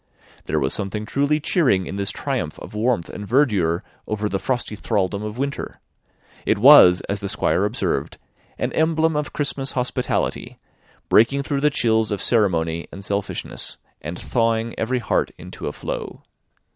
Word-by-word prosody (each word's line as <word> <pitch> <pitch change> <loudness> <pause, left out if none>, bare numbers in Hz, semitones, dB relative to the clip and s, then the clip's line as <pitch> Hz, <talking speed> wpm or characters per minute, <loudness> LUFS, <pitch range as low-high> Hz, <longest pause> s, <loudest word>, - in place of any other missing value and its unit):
There - - 0
was 65 +2 0
something 105 +1 -2
truly 145 +6 +1
cheering 135 - +2
in - - -6
this 100 0 -1
triumph - - -3
of 105 - -10
warmth 110 -4 0
and 105 - -7
verdure 100 - +2 0.2
over 105 0 -1
the 95 -1 -2
frosty 125 -3 -2
thraldom 100 -2 -1
of 105 +1 -5
winter; 140 +1 -4 0.6
it 110 - +2
was, 105 -7 +8
as 100 +1 -3
the 100 -1 -3
Squire - - +2
observed, - - -2 0.4
an - - -2
emblem 160 0 +2
of 150 0 -2
Christmas 140 -2 -2
hospitality, 125 -1 -2 0.5
breaking 140 +6 +4
through 140 0 -2
the 150 - +4
chills 110 -5 +1
of 105 -2 -2
ceremony 85 -7 +1
and 100 0 -8
selfishness, 100 -1 -4 0.2
and 85 - -6
thawing 115 0 0
every 125 +3 -1
heart 120 - 0
into - - -8
a - - -1
flow. - - -6
110 Hz, 160 wpm, -22 LUFS, 100-135 Hz, 0.6 s, was